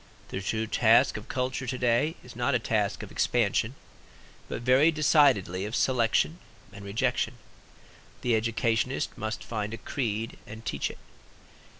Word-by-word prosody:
The 95 - -4
true 110 +3 -1
task - - +4
of - - -7
culture 130 0 -2
to 130 +1 -2
day 125 +6 +2
is 125 - -12
not 120 +3 +1
a - - +5
task 110 -3 -1
of - - -9
expansion, 115 +1 +1 0.7
but - - -4
very 130 +6 +5
decidedly 145 - +3
of 105 +4 -3
selection 130 +6 +2 0.3
and 100 - -10
rejection. 100 +2 -1 0.9
The 120 - +1
educationist 115 +3 0
must 110 0 -4
find 110 -1 -3
a - - -10
creed 115 -2 -3
and 110 +1 -10
teach 70 - -1
it. - - -10
115 Hz, 145 wpm, -28 LUFS, 110-130 Hz, 0.9 s, a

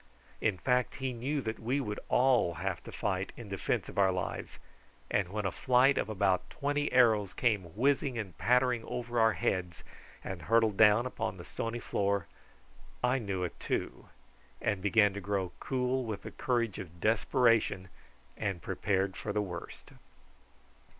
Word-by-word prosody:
In 105 -4 +1
fact 125 +4 +1
he 130 -1 -3
knew 135 +5 -2
that 110 -2 -4
we 125 +5 0
would 105 -6 -3
all 125 -9 +3
have 90 +1 -3
to - - -8
fight - - -2
in - - -9
defence - - -1
of - - -4
our 95 -1 +5
lives, 90 0 -4 0.5
and 95 -3 +1
when 105 +1 -3
a 95 - +1
flight 130 +2 +3
of - - -2
about 100 -3 +1
twenty 145 +1 -1
arrows 110 -6 +4
came 100 -8 0
whizzing 135 +1 +1
and 100 -6 -5
pattering 125 -1 +3
over 120 -1 -3
our 110 -1 +5
heads 90 -1 -2 0.4
and 95 -2 -5
hurtled 110 +3 +3
down 105 +3 +6
upon 110 -6 -3
the 85 - -9
stony 115 +1 -4
floor, 100 -5 0 0.8
I 125 +2 +3
knew 100 -5 -3
it 90 - -5
too, - - -3 0.5
and 100 -3 -1
began 105 0 +4
to 100 - -5
grow 100 -3 -1
cool 130 0 -1
with 110 -4 -5
the - - -7
courage 115 -5 -1
of 85 -3 -9
desperation 110 -2 +2 0.5
and 100 -4 -2
prepared 95 +2 -1
for 105 - -4
the 105 - 0
worst. 90 -3 -8
110 Hz, 165 wpm, -31 LUFS, 95-125 Hz, 0.8 s, down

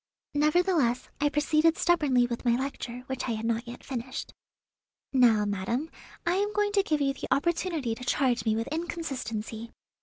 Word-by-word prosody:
Nevertheless, 300 -4 +2
I 290 0 +3
proceeded 305 +2 +3
stubbornly 290 -8 +3
with 235 -1 -4
my 240 -1 +3
lecture, 250 -2 -4
which 265 -1 -3
I - - +1
had 220 0 -4
not 230 +1 -1
yet 240 - -9
finished. 255 -1 -5 0.8
"Now, 230 -5 +5
madam, 205 +10 -2 0.3
I 345 +2 +2
am 410 +1 +1
going 415 0 +1
to 405 -1 +4
give 310 -6 0
you 275 -1 +2
the - - -6
opportunity 330 -5 0
to 250 - -8
charge 245 -3 +1
me 220 0 +1
with 225 +1 -1
inconsistency. 245 -9 -4
265 Hz, 170 wpm, -28 LUFS, 235-320 Hz, 0.8 s, Now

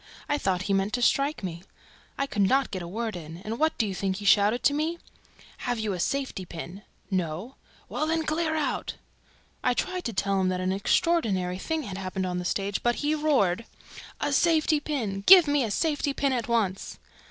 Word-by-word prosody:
I 290 0 0
thought 185 -5 0
he 200 - 0
meant 195 +2 0
to 245 - 0
strike 275 0 +2
me. 170 -2 -5 0.6
I 275 - 0
could 210 -7 -2
not 265 +7 +3
get 185 -2 -4
a 170 - -6
word 220 +3 -3
in; 165 -1 -8
and 225 +2 -4
what 315 0 +2
do 225 - +2
you 200 - -3
think 190 0 -1
he 205 +1 -7
shouted 205 +5 +4
at 285 - 0
me? 320 +3 -1 0.6
'Have 245 -1 -2
you 215 -2 -1
a 180 - -4
safety 270 -2 -2
pin?' 175 +2 -8 0.3
'No!' 185 +6 -2 0.3
'Well, 310 - -2
then, 325 0 +1
clear 315 +1 0
out!' 305 -2 -2 0.7
I 250 - +2
tried 365 +5 -2
to 230 - -2
tell 195 0 +1
him 185 - +2
that 185 0 -1
an 185 0 0
unheard 330 - +2 0.3
of 185 - -8
thing 320 -1 -2
had 195 -5 -6
happened 190 0 -3
on 180 -1 -2
the 180 - -5
stage, 200 +2 -1
but 240 0 +2
he 295 +1 0
roared, 260 - +1 0.5
'A 290 - -1
safety 315 -1 +3
pin! 230 -10 -3
Give 365 -5 +10
me 290 -2 +2
a 225 - -2
safety 290 - 0
pin 275 -2 +1
at 240 -3 -2
once!' 210 -5 -1
225 Hz, 210 wpm, -27 LUFS, 190-290 Hz, 0.7 s, Give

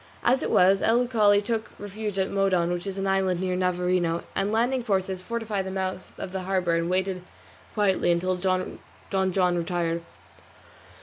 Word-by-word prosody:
As 255 +2 +3
it - - -2
was, 190 +2 +4
El 240 +2 +3
Uchali 210 -4 +3
took 225 0 -2
refuge 205 0 -5
at 190 0 0
Modon, 185 -3 +2
which 175 +2 -4
is 195 0 -4
an 195 - -2
island 190 -2 +1
near 185 0 -1
Navarino, 180 -2 0
and 195 +1 0
landing 245 +4 +1
forces 190 -3 -1
fortified 215 -1 -3
the - - -3
mouth 190 -1 -4
of 185 - -6
the 190 0 -3
harbour 180 -3 +1
and 170 +1 0
waited 185 0 0 0.5
quietly 200 -4 +2
until 185 +2 +1
Don 185 0 -1 0.3
John 190 -2 +2
retired. 170 -1 -1
190 Hz, 170 wpm, -26 LUFS, 180-205 Hz, 0.5 s, was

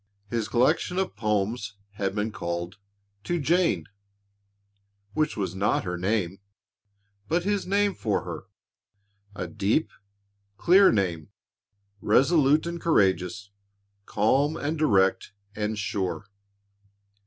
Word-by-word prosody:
His 115 -3 -1
collection 150 +8 +1
of 190 -1 -1
poems 105 0 -1 0.2
had 100 -1 -3
been 105 +1 -1
called 85 0 -5 0.5
"To 175 0 -1
Jane" 160 - +1 1.3
which 155 +2 0
was 95 -4 -2
not 95 +2 0
her 90 0 -3
name, 95 0 -1 0.9
but 170 +2 0
his 200 0 -1
name 200 +1 +2
for 110 - -1
her 90 +1 -7 0.9
a - - -4
deep, 110 +8 0 0.7
clear 190 - +6
name, 90 -6 -1 0.7
resolute 145 +6 +3
and 170 0 -5
courageous, 100 - +1 0.6
calm 135 +8 +2
and 150 +3 -2
direct 100 -11 +2 0.2
and 105 0 -2
sure. 100 0 -3
110 Hz, 110 wpm, -26 LUFS, 95-155 Hz, 1.3 s, clear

